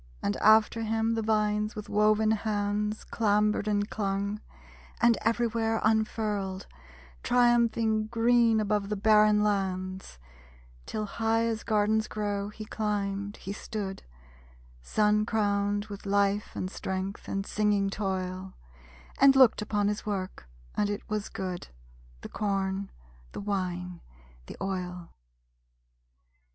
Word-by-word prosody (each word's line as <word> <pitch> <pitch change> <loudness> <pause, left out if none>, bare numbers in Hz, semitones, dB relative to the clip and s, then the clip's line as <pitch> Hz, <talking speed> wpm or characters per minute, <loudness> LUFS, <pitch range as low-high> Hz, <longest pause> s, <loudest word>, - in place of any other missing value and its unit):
And 100 - 0
after 220 +1 +4
him 225 +1 0
the 225 - -1
vines 210 -1 0
with 210 -1 -6
woven 215 +1 +3
hands 210 0 -1
Clambered 210 -1 +1
and 205 -1 +1
clung, 200 0 -2 0.6
and 235 -1 +5
everywhere 230 -1 +1
unfurled 210 -3 0 0.6
Triumphing 230 -3 +2
green 230 0 +3
above 210 -1 0
the 210 - -1
barren 210 0 +4
lands; 190 - -2 0.7
Till 215 -1 -3
high 225 +2 0
as 225 -1 -1
gardens 215 0 +1
grow, 205 -1 -3
he 215 +1 -9
climbed, 205 -2 -2
he 195 - -6
stood, 205 -2 -5 0.8
Sun 210 - +2
crowned 205 -2 0
with 205 -1 -9
life 200 +1 +1
and 185 - -3
strength, 190 +1 -4
and 195 0 -2
singing 205 -2 +1
toil, 190 -2 -3 0.6
And 275 0 +7
looked 260 -5 +6
upon 210 -1 0
his 210 +1 -2
work; 185 - -5 0.2
and 205 - 0
it 205 0 -4
was 210 -1 -2
good: 185 -2 -5 0.5
The - - -8
corn, 195 -1 -2 0.4
the - - -5
wine, 180 -3 -3 0.5
the - - -9
oil. 180 -2 -4
210 Hz, 120 wpm, -28 LUFS, 195-220 Hz, 0.8 s, And